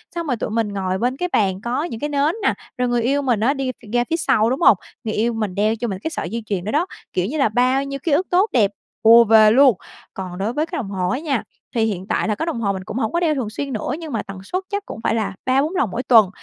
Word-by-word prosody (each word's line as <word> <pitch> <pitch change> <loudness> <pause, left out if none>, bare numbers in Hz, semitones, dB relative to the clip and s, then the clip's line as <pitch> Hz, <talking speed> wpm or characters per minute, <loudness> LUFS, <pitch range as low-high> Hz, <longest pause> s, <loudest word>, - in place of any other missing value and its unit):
xong 340 -1 -3
rồi 255 - +1
tụi - - -3
mình 225 0 0
ngồi 190 -2 -2
bên 250 +5 -1
cái 360 +3 -2
bàn 190 -3 +1
có 245 +6 -1
những 235 -10 -5
cái 295 - -2
nến 290 +3 +1
nè, - - +3 0.2
rồi 250 0 +1
người 240 -1 +1
yêu 275 +5 +1
mình 250 -6 +1
á 240 +6 +2
đi 270 -2 -2
ph 240 - -19
ra 240 0 +3
phía 330 - +1
sau, 245 -8 +2
đúng 260 +5 -2
hông? 250 - +7 0.3
Người 220 -2 -3
yêu 230 +2 0
mình 215 -5 -3
đeo 215 +2 +2
cho 240 +2 -3
mình 190 -4 -4
cái 320 - -2
sợi - - -4
dây 230 0 -4
chuyền 195 -4 -2
đó 215 - -2
đó, 310 +4 +2 0.3
kiểu 180 - 0
như 275 +10 -3
là 275 -6 +3
bao 255 +4 +2
nhiêu 275 0 -5
ký 330 - 0
ức 330 +6 +2
tốt 375 +5 +3
đẹp 215 -5 +3 0.3
ùa 230 +1 +8
về 215 -1 +6
luôn. 260 -3 +5 0.4
Còn 185 -2 -6
đối 205 +5 -2
với 300 +4 0
cái - - -5
đồng 205 - -4
hồ 185 -2 -1
á 255 - -1
nha, 290 -6 -1 0.3
thì 225 - +2
hiện 195 -4 -3
tại - - 0
là 210 - 0
cái 320 - -3
đồng 305 -9 -3
hồ 200 -3 +1
mình 190 -1 -6
cũng 210 - -6
hổng 225 -4 -1
có 340 - +2
đeo 325 -3 +1
thường 250 -6 -2
xuyên 275 +5 -5
nữa 215 - -3
nhưng 320 -3 -7
mà 225 - -1
tần 195 0 -9
suất 370 - -3
chắc 405 -1 -3
cũng - - -8
phải 225 - +1
là 210 -3 -1
3-4 275 +7 +1
lần 265 - +1
mỗi 240 +6 -3
tuần. 225 -7 +6
235 Hz, 305 wpm, -21 LUFS, 215-280 Hz, 0.4 s, ùa